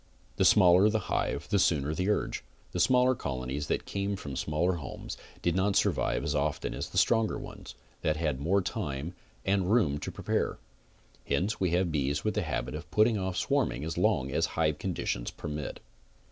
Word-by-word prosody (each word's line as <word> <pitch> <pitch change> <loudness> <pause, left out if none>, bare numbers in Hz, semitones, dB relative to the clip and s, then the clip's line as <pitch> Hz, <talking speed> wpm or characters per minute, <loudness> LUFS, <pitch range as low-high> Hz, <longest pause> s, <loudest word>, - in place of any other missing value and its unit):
The - - +3
smaller 90 +3 +6
the 110 - +1 0.2
hive 75 - -1
the 100 - +3
sooner 75 -4 +2
the 90 +5 -1
urge. 105 - 0 0.3
The 90 - -3
smaller 125 +6 +4
col 70 - -4
onies 70 +3 -3
that - - -1
came 100 0 -2
from 80 -7 -7
the 65 - -5
smaller 80 +6 0
homes 70 -6 -7 0.3
did 85 -1 +1
not 95 +1 +2
survive - - +1
as 75 0 -1
often 75 0 -1
as - - -4
the - - -6
stronger 115 -2 +3
ones, - - -9 0.3
that 75 0 +1
had 75 -5 -1
more 95 +6 +2
time 80 -5 -3 0.3
and 95 -1 +1
room 85 -12 +3
to - - -5
prepare; - - -1 0.7
hence 95 +10 0
we 95 - +2
have 90 -1 +2
bees 70 0 0
with 110 - 0
the 105 - 0
habit 80 -7 -3
of 75 +2 -7
putting 110 0 +3
off 95 -1 -2
swarming 70 -5 0
as 80 +1 -3
long 65 +1 +1
as - - +1
hive 75 -2 +1
conditions 85 -9 -2
permit. 75 -1 -5
85 Hz, 190 wpm, -29 LUFS, 75-100 Hz, 0.7 s, smaller